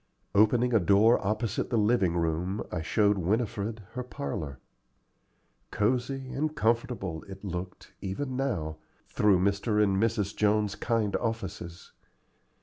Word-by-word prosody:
Opening 120 +4 +4
a 115 - +6
door 100 +6 +4
opposite 105 +2 -1
the 120 - +1
living 105 -5 +2
room, 85 +5 -1
I 85 - -2
showed 100 +4 +2
Winifred 110 +3 -1
her 125 - -4
parlor. 80 - -5 1.1
Cosey 130 +4 -1
and 155 +2 -1
comfortable 115 - 0
it 95 +1 -9
looked, 90 0 -6
even 125 +8 -3
now, 95 - -2 0.3
through 105 -3 +4
Mr. 100 +3 +1
and 100 -1 +2
Mrs. 110 -3 0
Jones's 105 -1 +2
kind 115 -4 0
offices. 95 -6 -5
105 Hz, 125 wpm, -29 LUFS, 95-115 Hz, 1.1 s, a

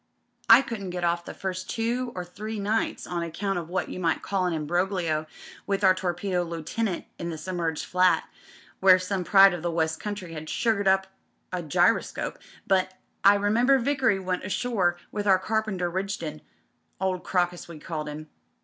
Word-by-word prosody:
I 235 +4 +9
couldn't 200 -7 -5
get 180 0 -4
off 170 0 0
the - - -7
first 185 -1 -4
two 240 +2 -1
or 180 -1 -4
three 210 +4 -6
nights 215 +3 -1
on 175 -1 -3
account 185 +3 -2
of 165 -1 -8
what 185 - -1
you - - -6
might 165 -3 0
call 190 -2 0
an 175 - -1
imbroglio 165 0 -1 0.4
with 200 0 -1
our 190 -1 +7
Torpedo 180 0 -1
Lieutenant 170 +4 -3
in 170 - -3
the 165 - -5
submerged 165 -1 -3
flat, 180 0 +3 0.6
where 185 -1 +7
some 185 0 -2
pride 195 +1 +7
of 175 - -4
the 175 - -1
West 160 -1 0
country 205 -5 -5
had 155 0 -7
sugared 215 -4 +1
up 190 0 +4 0.5
a 180 - -1
gyroscope; 175 +7 +1 0.3
but 185 -1 +1 0.3
I 200 +1 +7
remember 230 +7 +3
Vickery 260 -4 +2
went 185 -1 -3
ashore 190 -3 0
with 205 0 -3
our 190 -1 +6
Carpenter 215 -4 -1
Rigdon 175 -4 -4 0.3
— - - -45
old 185 -1 -1
Crocus 175 -1 -1
we 170 -2 -9
called 150 -1 -5
him. 155 +1 -7
185 Hz, 175 wpm, -26 LUFS, 170-200 Hz, 0.6 s, I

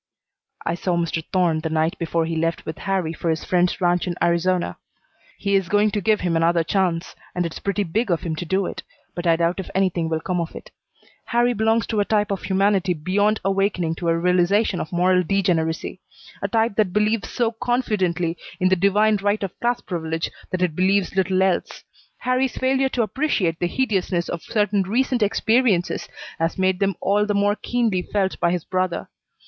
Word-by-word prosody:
"I 170 - 0
saw 175 0 -1
Mr. 165 -1 -1
Thorne 175 -4 +2
the 160 - -3
night 160 +1 0
before 165 0 0
he 165 0 -3
left 165 +1 -1
with 160 - -6
Harrie 190 -5 -1
for 170 - -3
his 160 -1 -1
friend's 180 -1 +1
ranch 175 0 +1
in 175 - -2
Arizona. 175 +1 +1 0.6
He 200 -1 -1
is 195 -3 +2
going 205 +1 +3
to 205 - -1
give 215 +2 +2
him 175 -2 0
another 165 +1 +3
chance, 180 -1 -1 0.2
and 180 -1 0
it's 165 - -5
pretty 200 +1 -1
big 205 +6 -1
of 170 -3 +1
him 160 -2 -3
to 175 - -3
do 190 +3 0
it, - - -5 0.3
but 175 0 -4
I 165 - +5
doubt 170 +2 0
if 190 - -5
anything 180 -4 +1
will 160 -1 0
come 180 +1 -2
of 165 - -6
it. - - -10 0.5
Harrie 240 0 +2
belongs 225 +1 +2
to 220 - -1
a - - +4
type 210 -1 +1
of 195 - -2
humanity 195 -1 +1
beyond 205 +7 +1
awakening 195 -4 +1
to 170 - -3
a 165 - +2
realization 180 +3 +2
of 155 - -5
moral 180 +1 +3
degeneracy; 170 -3 0 0.4
a - - 0
type 225 -2 0
that 205 -5 +2
believes 210 +1 +1
so 235 -2 0
confidently 190 -9 -1 0.2
in 185 -1 +3
the 190 - +4
divine 205 +3 +3
right 205 +1 0
of 195 - -4
class 240 0 0
privilege 160 -3 -3 0.2
that 185 0 -1
it 170 -4 0
believes 190 +2 +1
little 190 0 +2
else. 190 -2 -1 0.4
Harrie's 255 +1 0
failure 265 +1 +2
to 245 -2 0
appreciate 215 - 0
the 175 - +1
hideousness 190 -7 -1
of 170 - -4
certain 205 -2 +1
recent 240 +5 0
experiences 220 -2 +1 0.3
has 165 +1 0
made 190 -1 +1
them 195 -2 +1
all 205 +1 +2
the 205 - 0
more 205 +1 +2
keenly 225 -6 0
felt 190 0 -1
by 170 - +2
his 175 -2 -2
brother. 185 -1 -1
185 Hz, 195 wpm, -22 LUFS, 170-210 Hz, 0.6 s, I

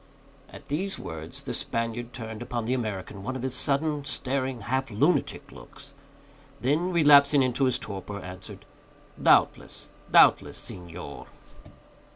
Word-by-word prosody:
At - - -13
these 190 +7 -2
words 80 -1 -7
the - - -4
Spaniard 115 +1 -2
turned 110 -3 -7
upon 120 -1 -3
the 125 - 0
American 105 -5 -4
one 130 +6 -4
of 130 - -5
his 130 -1 -1
sudden, 145 +3 +1
staring, 135 -3 -2
half 130 +5 -1
lunatic 145 +11 0
looks; 140 0 -12 0.7
then, 155 +8 +1
relapsing 145 -4 +6
into 130 +1 +1
his 130 -2 +2
torpor, 100 0 -7
answered, 90 0 -10 0.6
"Doubtless, - - +2 0.2
doubtless, - - +5
Señor." 85 -4 -8
125 Hz, 130 wpm, -27 LUFS, 105-140 Hz, 0.7 s, relapsing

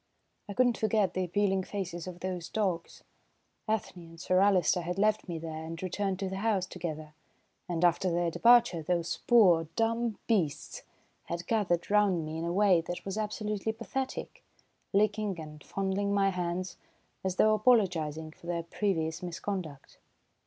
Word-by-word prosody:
I - - -3
could 255 +4 +4
not 245 -1 +1
forget 215 -4 +2
the 185 - 0
appealing 195 +1 +1
faces 180 -4 -5
of 180 -1 -8
those 180 -2 -4
dogs. 185 -6 -2 0.6
Ethne 215 -4 -2
and 165 0 -13
Sir 185 +3 +2
Alister 185 -3 +3
had 180 +2 -4
left 210 -1 +1
me 170 - -3
there 160 -1 -6
and 165 +1 -6
returned 190 +1 -1
to 195 - -1
the 190 0 -4
house 200 -3 +1
together, 155 -4 -6 0.6
and, 175 0 +1
after 175 +2 +2
their 170 0 0
departure, 235 -5 +5
those 170 +1 -1
poor, 185 -9 +6
dumb 230 -1 0
beasts 180 -11 -1 0.4
had 170 +1 -4
gathered 200 -6 0
round 200 -6 +3
me 155 +1 -5
in 165 - -3
a 170 - -1
way 190 -2 +4
that 175 +2 -6
was 195 0 -3
absolutely 215 0 -2
pathetic, 260 +4 -5 0.5
licking 210 -2 +1
and 150 -1 -9
fondling 195 +1 -1
my 195 -1 +3
hands, 180 0 -3 0.5
as 190 -1 -1
though 215 +3 +4
apologising 180 - +2
for 170 - -15
their 170 -1 -2
previous 165 -3 -1
misconduct. 175 -5 -5
185 Hz, 160 wpm, -30 LUFS, 170-210 Hz, 0.6 s, poor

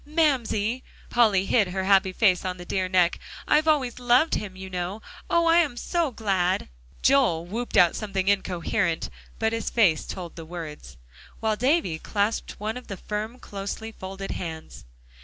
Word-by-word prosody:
"Mamsie," 260 -7 +1 0.3
Polly 210 -6 +4
hid 210 -1 +3
her 190 +1 -2
happy 190 -1 +4
face 185 -2 +3
on 185 -1 -3
the 175 - -9
dear 185 0 -1
neck, 180 -2 +3 0.3
"I've 310 +1 +3
always 265 -6 +2
loved 250 +6 +3
him, 195 -3 -3
you 190 0 -8
know; 185 +3 -4 0.3
oh! 335 0 +3
I'm 330 -6 +3
so 340 +3 0
glad." 190 -6 0 0.3
Joel 245 -12 +3
whooped 230 +7 -3
out 175 -2 +6
something 195 -3 -2
incoherent, 180 -4 0 0.3
but 220 0 0
his 225 -1 -2
face 190 -10 +3
told 175 -3 -7
the 165 - -8
words, 155 - -8 0.4
while 220 -1 +1
Davie 250 - +1
clasped 205 +4 -2
one 215 +3 -3
of 250 - -10
the 195 - -6
firm, 215 +5 -4
closely 205 +1 -6
folded 195 -1 -7
hands. 160 - -7
200 Hz, 160 wpm, -25 LUFS, 185-240 Hz, 0.4 s, out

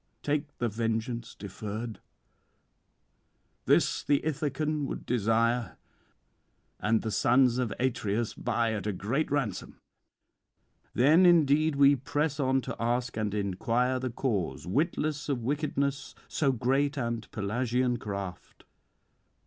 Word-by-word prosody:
Take 145 0 -2
the 120 - 0
vengeance 115 +2 -3
deferred; 105 +3 -6 1.7
this - - +3
the 145 -1 +2
Ithacan 150 0 -1
would - - -6
desire, 115 +1 +1 1.0
and 110 +1 +1
the 110 - -2
sons 125 +2 +3
of 120 -4 -1
Atreus 115 -3 -1
buy 115 -2 0
at 105 -1 -3
a 105 - 0
great 120 - -1
ransom." 130 -10 -2 1.2
'Then 155 +9 +6
indeed 155 -2 +4
we 140 0 +6
press 145 +3 -2
on 135 -1 +2
to 125 -2 -5
ask 120 +1 -1
and 105 -1 -1
inquire 115 +6 0
the 130 0 -2
cause, 115 -6 -2
witless 150 - -1
of 125 -5 -1
wickedness 140 0 -1
so 140 -4 +1
great 135 +4 +1
and 115 -3 -3
Pelasgian 120 +4 0
craft. 100 -4 -7
125 Hz, 115 wpm, -29 LUFS, 115-140 Hz, 1.7 s, Then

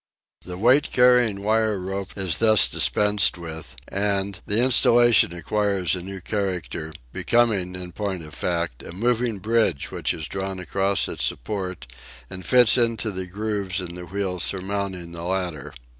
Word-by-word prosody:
The 90 +1 -7
weight 125 +8 +3
carrying 125 -5 +4
wire 110 0 +1
rope 95 +1 -5
is 95 -4 -1
thus 110 -2 +6
dispensed 105 -2 +2
with, 80 -2 -8
and 100 -1 -2
the 105 +2 +1
installation 120 -5 +5
acquires 95 +1 -1
a 90 - -5
new 95 +2 -7
character, 90 -5 -3 0.2
becoming, 105 -7 +1
in 90 0 -7
point 95 -3 -4
of 75 -1 -12
fact, 85 -7 -2
a - - -10
moving 120 +2 0
bridge 110 -6 0
which - - -1
is 80 - -6
drawn 95 +2 -4
across 95 +2 0
its - - -4
supports 90 - -3 0.5
and 95 -1 -8
fits 125 +2 +5
into 115 -2 0
the 95 -1 -5
grooves 100 -1 -3
in 90 -2 -6
the 90 0 -9
wheels 95 -1 -3
surmounting 95 -2 -3
the 85 0 -8
latter. 90 -5 -3
95 Hz, 155 wpm, -23 LUFS, 90-110 Hz, 0.5 s, thus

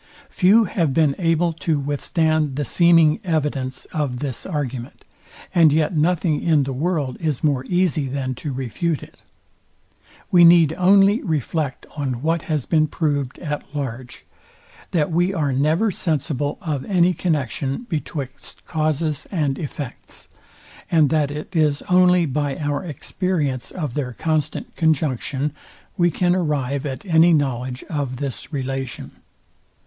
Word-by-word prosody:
Few 205 +5 +5
have 165 -8 -1
been 150 -4 +3
able 165 -1 +2
to 160 -2 -1
withstand 150 +1 0
the 145 0 -2
seeming 165 +1 +4
evidence 145 -6 -2
of 145 -5 -1
this 130 -2 -4
argument; 135 -8 -5 0.5
and 165 -4 +6
yet 155 +3 +1
nothing 160 0 +1
in 155 -4 +3
the 135 0 -3
world 145 -2 -1
is 155 -5 -2
more 140 -4 +1
easy 175 -5 +1
than 130 -1 -3
to 140 +4 -5
refute 135 +5 -2
it. - - -15 1.1
We 175 -2 +7
need 170 -2 +7
only 195 +4 +4
reflect 155 - -2
on 135 -4 -3
what 165 +1 +1
has 150 -5 0
been 155 -2 +2
proved 145 -4 -1
at 150 -2 -6
large, 130 -3 -6 0.6
that 160 -2 0
we 175 +4 +1
are 145 -5 0
never 155 +11 +2
sensible 150 -4 -2
of 150 -7 -3
any 180 -2 +3
connexion 145 - -2
betwixt 145 - -6
causes 155 -2 -1
and 150 -8 -1
effects, 145 -4 -7 0.6
and 155 -4 +3
that 150 -3 +2
it 150 +5 -7
is 150 -3 +2
only 180 -1 +4
by 145 -1 -2
our 145 +2 -2
experience 150 - -2
of 150 -9 -4
their 130 -3 -3
constant 155 +1 -2
conjunction, 150 -2 0 0.4
we 175 -1 +3
can 175 +2 +1
arrive 145 -5 -1
at 135 +8 -6
any 165 -1 +5
knowledge 130 -3 -2
of 140 -5 -3
this 140 +1 -5
relation. 135 -5 -4
150 Hz, 140 wpm, -21 LUFS, 140-165 Hz, 1.1 s, We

